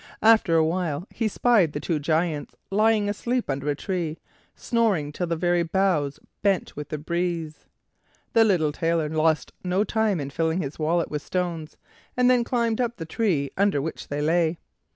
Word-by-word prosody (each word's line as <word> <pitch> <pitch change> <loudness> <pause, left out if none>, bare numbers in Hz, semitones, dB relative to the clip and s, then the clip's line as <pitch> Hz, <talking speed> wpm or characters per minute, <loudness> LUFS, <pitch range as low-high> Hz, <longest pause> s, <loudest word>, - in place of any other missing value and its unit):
After 220 -6 +5
a 160 -1 +4
while 165 -1 -1
he 225 - -1
spied 210 -7 +3
the 145 - -3
two 160 0 -1
Giants 155 0 -1 0.2
lying 215 +1 +3
asleep 235 - -1
under 140 +2 -2
a 145 - +1
tree, 170 -1 -3 0.4
snoring 205 -11 0
till 175 +4 -3
the 165 - 0
very 175 +1 +1
boughs 170 -5 0 0.2
bent 195 -3 0
with 150 0 -7
the 155 - -3
breeze. 170 0 -3 0.7
The 225 - +6
little 175 -8 +2
Tailor 165 0 0
lost 155 0 +1
no 185 +2 +1
time 215 -3 0
in 140 -1 -5
filling 160 +3 0
his 140 +2 -7
wallet 165 +2 0
with 150 -1 -2
stones, 170 -4 -3 0.4
and 250 0 +5
then 245 -1 +3
climbed 235 -1 0
up 235 -1 -2
the 165 - -5
tree 160 - 0
under 200 -6 +2
which 155 +3 -5
they 145 +1 -2
lay. 165 +1 +2
170 Hz, 175 wpm, -25 LUFS, 155-205 Hz, 0.7 s, The